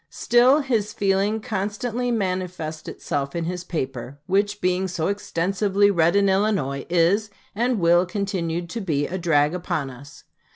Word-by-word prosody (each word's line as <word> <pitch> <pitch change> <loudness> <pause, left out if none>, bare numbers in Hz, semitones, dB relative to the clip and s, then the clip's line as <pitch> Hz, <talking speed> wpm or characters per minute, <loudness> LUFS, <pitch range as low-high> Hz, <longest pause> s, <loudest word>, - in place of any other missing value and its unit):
Still 250 +5 +4
his 225 -6 -1
feeling 200 +2 +1
constantly 225 +3 -2
manifests 180 -7 -3
itself 140 +1 -4
in 170 - -1
his 180 +1 -4
paper, 135 -6 -5
which, 205 +3 0
being 185 0 0
so 170 -2 -2
extensively 200 +1 +1
read 170 -1 +3
in 200 0 +4
Illinois, 190 -9 0
is, 180 +5 +2 0.2
and 240 +1 0
will 175 +1 +4
continue 175 -3 -2
to 225 +7 -5
be, 150 -7 0
a 185 +4 -4
drag 150 -3 +2
upon 155 -6 -3
us. 140 +3 -13
185 Hz, 150 wpm, -23 LUFS, 165-205 Hz, 0.2 s, Still